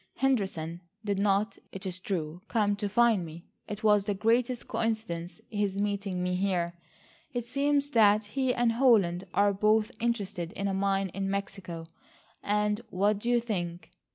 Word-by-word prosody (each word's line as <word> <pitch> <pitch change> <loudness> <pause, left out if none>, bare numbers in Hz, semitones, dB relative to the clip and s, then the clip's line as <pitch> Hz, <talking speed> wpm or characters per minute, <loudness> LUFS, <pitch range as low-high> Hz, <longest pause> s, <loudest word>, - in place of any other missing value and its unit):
Henderson 190 -11 0 0.2
did 200 -2 0
not, 200 0 +1
it 195 0 -8
is 185 -1 -4
true, 175 -3 -3
come 205 -3 +2
to 205 0 -2
find 225 -2 +4
me. 165 +1 -9 0.2
It 210 +1 -6
was 210 -2 +4
the 205 -1 0
greatest 235 +4 +1
coincidence 215 -6 -2
his 205 -2 -1
meeting 200 -2 -1
me 180 0 0
here. 180 -2 0 0.6
It 240 -2 -2
seems 285 +3 +1
that 215 -3 +5
he 260 +4 0
and 240 -1 +2
Holland 210 -8 +3
are 200 0 +4
both 215 +3 +3
interested 205 -7 -2
in 200 - -2
a 195 - 0
mine 195 0 +1
in 195 +2 -3
Mexico, 195 -4 -4 0.6
and 210 +1 +1
what 200 +2 +1
do 235 - -2
you 240 0 +4
think?" 175 -7 -4
205 Hz, 160 wpm, -29 LUFS, 190-225 Hz, 0.6 s, that